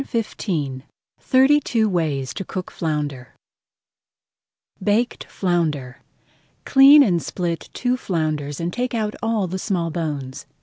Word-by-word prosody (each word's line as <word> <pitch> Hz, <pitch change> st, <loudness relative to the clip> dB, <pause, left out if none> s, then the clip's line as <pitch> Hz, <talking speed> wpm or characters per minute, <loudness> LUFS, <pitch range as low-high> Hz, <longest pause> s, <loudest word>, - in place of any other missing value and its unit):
[Page 270 Hz, -, -8 dB
137] 150 Hz, -, -2 dB, 0.4 s
THIRTY 265 Hz, +3 st, +4 dB
TWO 230 Hz, -6 st, +1 dB
WAYS 155 Hz, -8 st, -1 dB
TO -, -, -5 dB
COOK 185 Hz, 0 st, -6 dB
FLOUNDER 145 Hz, -6 st, -4 dB, 1.5 s
BAKED 220 Hz, +5 st, 0 dB
FLOUNDER 155 Hz, -9 st, -2 dB, 0.6 s
Clean 275 Hz, +2 st, +8 dB
and 175 Hz, -8 st, +1 dB
split 170 Hz, -2 st, -4 dB
two 250 Hz, 0 st, 0 dB
flounders 155 Hz, -, -2 dB
and 170 Hz, +1 st, -3 dB
take 250 Hz, 0 st, -2 dB
out 215 Hz, -2 st, -1 dB
all 225 Hz, -3 st, 0 dB
the 185 Hz, +1 st, -4 dB
small 175 Hz, -5 st, -1 dB
bones. 145 Hz, -5 st, -4 dB
175 Hz, 125 wpm, -22 LUFS, 150-225 Hz, 1.5 s, Clean